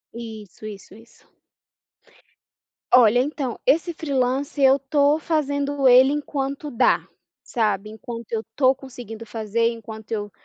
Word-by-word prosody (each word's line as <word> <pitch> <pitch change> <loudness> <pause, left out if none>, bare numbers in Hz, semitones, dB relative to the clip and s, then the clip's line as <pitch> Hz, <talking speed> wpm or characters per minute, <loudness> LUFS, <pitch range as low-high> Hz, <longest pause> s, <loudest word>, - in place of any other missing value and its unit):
Isso, 220 -3 -9
isso, 200 -2 -10
isso. 230 +1 -20 1.6
Olha, 245 -1 +6
então, 265 -2 -2
esse 330 +6 +2
freelancer 275 -1 0
eu 265 +1 +6
tô 285 +2 +2
fazendo 285 -3 0
ele 255 +2 +7
enquanto 285 0 -3
dá, 240 - +2 0.4
sabe? 215 -3 -1
Enquanto 230 +1 -9
eu 225 -1 -2
tô 265 -1 +4
conseguindo 240 -4 -10
fazer, 225 +1 -1
enquanto 220 -1 -9
eu 205 -2 -3
250 Hz, 120 wpm, -23 LUFS, 225-280 Hz, 1.6 s, ele